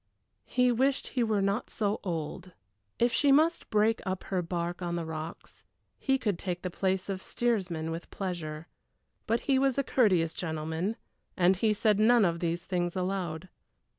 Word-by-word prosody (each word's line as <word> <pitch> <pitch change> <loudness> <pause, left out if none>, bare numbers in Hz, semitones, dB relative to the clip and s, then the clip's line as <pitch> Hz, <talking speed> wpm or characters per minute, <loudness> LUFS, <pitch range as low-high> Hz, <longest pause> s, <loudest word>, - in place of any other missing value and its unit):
He 250 -1 +3
wished 265 +3 +1
he 250 - 0
were 215 -3 +1
not 200 +4 0
so 210 -1 -1
old. 175 +1 -4 0.4
If 240 0 +2
she 285 -1 +4
must 315 +5 +3
break 215 +1 +2
up 190 -2 -3
her 185 -2 -1
bark 175 +1 -3
on 170 -1 -2
the 170 -1 -2
rocks, 160 +1 -7 0.4
he 270 -1 +2
could 205 -8 -1
take 180 -2 -3
the 180 - -3
place 190 +1 0
of 195 -2 -3
steersman 185 -11 -1
with 165 +1 -6
pleasure. 165 -4 -5 0.6
But 230 +1 +1
he 270 -2 +2
was 270 -1 +2
a 275 - +2
courteous 185 -12 +3
gentleman 160 +4 -2 0.4
and 180 +1 +4
he 215 +3 +2
said 210 0 +2
none 230 0 +5
of 170 -1 0
these 170 0 -2
things 175 -1 -1
aloud. 185 -2 -2
190 Hz, 170 wpm, -29 LUFS, 170-225 Hz, 0.6 s, none